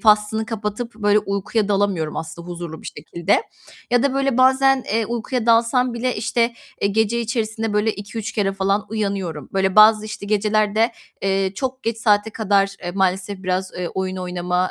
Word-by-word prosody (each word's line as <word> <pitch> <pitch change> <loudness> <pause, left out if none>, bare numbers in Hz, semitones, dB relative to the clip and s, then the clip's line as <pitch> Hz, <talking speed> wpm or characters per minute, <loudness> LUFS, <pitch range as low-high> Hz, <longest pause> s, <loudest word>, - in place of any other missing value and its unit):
faslını 215 0 +3
kapatıp, 220 +1 -4
böyle, 210 -1 +3
uykuya 200 +1 -1
dalamıyorum 195 -6 0
aslında 165 +2 -6
huzurlu 170 -2 -7
bir - - -9
şekilde. 170 - -1 0.5
Ya 245 0 +3
da 275 -1 +1
böyle 275 -2 +1
bazen, 265 +1 +5 0.2
eee, 225 -1 +1
uykuya 240 0 -2
dalsam 235 +2 +3
bile, 250 +1 -1
işte, 235 +2 +1 0.3
eee, 200 - +2
gece 220 +3 +1
içerisinde, 225 -2 -2
böyle, 210 +1 +2
2-3 215 +2 -6
kere 200 -3 0
falan 195 +1 0
uyanıyorum. 195 -9 -3
Böyle 190 0 +1
bazı, 215 0 +7
işte, 215 -1 -7
gecelerde, 215 +2 +2 0.3
eee, 195 0 +1
çok 260 +5 -4
geç 230 0 -2
saate 210 -1 +2
kadar, 200 -2 +1
eee, 175 - -3
maalesef 190 0 0
biraz, 185 0 -1
eee, 180 -1 -2
oyun 190 0 -3
oynama, 180 0 -1
210 Hz, 165 wpm, -21 LUFS, 190-225 Hz, 0.5 s, bazı